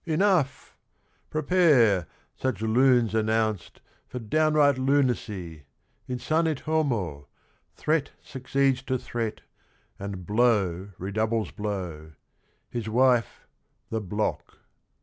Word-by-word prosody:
' - - -48
' - - -39
Enough! 185 -9 +1 0.5
Prepare, 145 - +3 0.3
Such 130 -5 -2
lunes 120 -1 +3
announced, 110 -3 -1 0.3
for - - -7
downright 145 +3 +2
lunacy 110 - -1 0.4
I - - -2
Insanit 155 +3 0
homo, 115 - -1 0.5
threat 155 -2 0
succeeds 135 0 0
to 130 -1 -1
threat, 115 -3 -4 0.6
And 100 -2 -6
blow 100 -5 +1
redoubles 110 +3 -1
blow, 90 -7 -5 0.3
— - - -43
his 115 -3 -4
wife, 125 0 +2 0.5
the 110 0 -1
block. 105 +2 -3
115 Hz, 105 wpm, -26 LUFS, 100-135 Hz, 0.6 s, Prepare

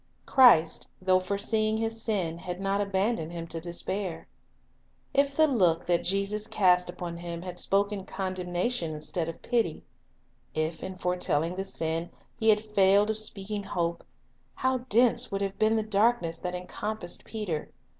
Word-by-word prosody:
Christ, 240 -12 +5
though 185 0 +3
foreseeing 215 +3 0
his 225 0 -2
sin, 185 -8 -1
had 180 +1 -6
not 195 +1 0
abandoned 195 -3 -1
him 165 -1 -5
to 165 - -4
despair. 175 +1 -3 0.9
If 280 0 +2
the 315 - +6
look 180 - +2
that 170 -1 +1
Jesus 200 +3 0
cast 180 -4 +3
upon 175 -1 -6
him 170 0 -6
had 180 -1 -6
spoken 200 0 0
condemnation 185 -1 -2
instead 160 +2 -3
of 165 - -9
pity; 230 -10 0 0.7
if 155 +1 -2
in 190 - -6
foretelling 180 -3 0
the 190 +1 -4
sin 165 -2 -3 0.3
He 220 - +3
had 215 0 +2
failed 200 +2 +5
of 220 - -1
speaking 210 -1 -2
hope, 170 -2 -2 0.5
how 260 0 +1
dense 240 +2 +4
would 195 0 -2
have 195 0 -4
been 220 +1 +3
the 220 - +1
darkness 210 -5 +1
that 180 0 -4
encompassed 180 +1 -4
Peter! 195 -9 -4
190 Hz, 155 wpm, -28 LUFS, 175-215 Hz, 0.9 s, the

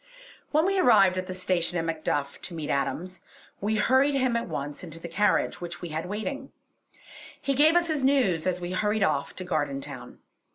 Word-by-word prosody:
When 310 +2 +3
we 390 0 +2
arrived 195 - +5
at 185 - -5
the 185 - -4
station 180 -2 0
at 165 - -1
Macduff 155 -3 -2
to 175 - -7
meet 155 -2 -3
Adams, 175 +7 -2 0.4
we 215 +2 0
hurried 260 +6 +3
him 255 -3 +1
at 235 0 -1
once 145 -2 -5
into 165 -2 -7
the 170 - -7
carriage 205 +3 +1
which 175 0 -6
we 175 - -4
had 160 +2 -4
waiting; 265 +8 -4 0.9
he 275 - -1
gave 305 +5 +5
us 350 0 +4
his 310 -5 -1
news 245 - +2
as 180 -1 0
we 175 0 -5
hurried 210 +2 +1
off 145 -6 0
to 185 - -5
Gardentown. 140 -6 -4
185 Hz, 195 wpm, -27 LUFS, 165-255 Hz, 0.9 s, arrived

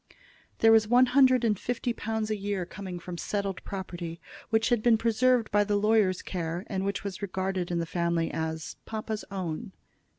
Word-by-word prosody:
There 225 - +5
was 220 -1 +5
one 245 +3 +6
hundred 255 -1 +5
and 215 -4 +2
fifty 245 0 -2
pounds 220 -1 -3
a - - +1
year 200 -2 -2
coming 185 0 -7
from 175 0 -7
settled 200 -2 -3
property, 175 -3 -6 0.3
which 225 +1 +2
had 240 -3 +2
been 230 0 +5
preserved 235 +1 +2
by 205 0 +4
the 205 0 0
lawyer's 205 -3 +2
care, 170 -1 -3
and 190 -4 -3
which 200 0 -2
was 200 -1 -5
regarded 190 -2 -2
in 175 - -1
the 170 - 0
family 170 0 0
as 160 -1 -4
"papa's 220 -1 -4
own." 190 +1 -4
200 Hz, 185 wpm, -28 LUFS, 180-225 Hz, 0.3 s, one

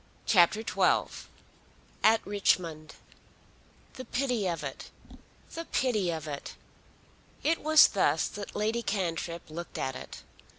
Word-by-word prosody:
CHAPTER 190 +1 +4
XII - - +1 0.8
At 220 0 +4
Richmond 170 -6 0 1.0
The 255 - -8
pity 245 -5 -1
of 170 -2 -3
it! - - -7 0.6
The 330 0 -5
pity 215 - 0
of 160 -2 -4
it! 145 -2 -6 0.9
It 325 +2 +1
was 310 0 +7
thus 160 -6 +1
that 205 -1 -8
Lady 220 +3 0
Cantrip 170 -5 -3
looked 170 +2 -7
at 130 0 -2
it. - - -9
200 Hz, 120 wpm, -29 LUFS, 165-230 Hz, 1.0 s, was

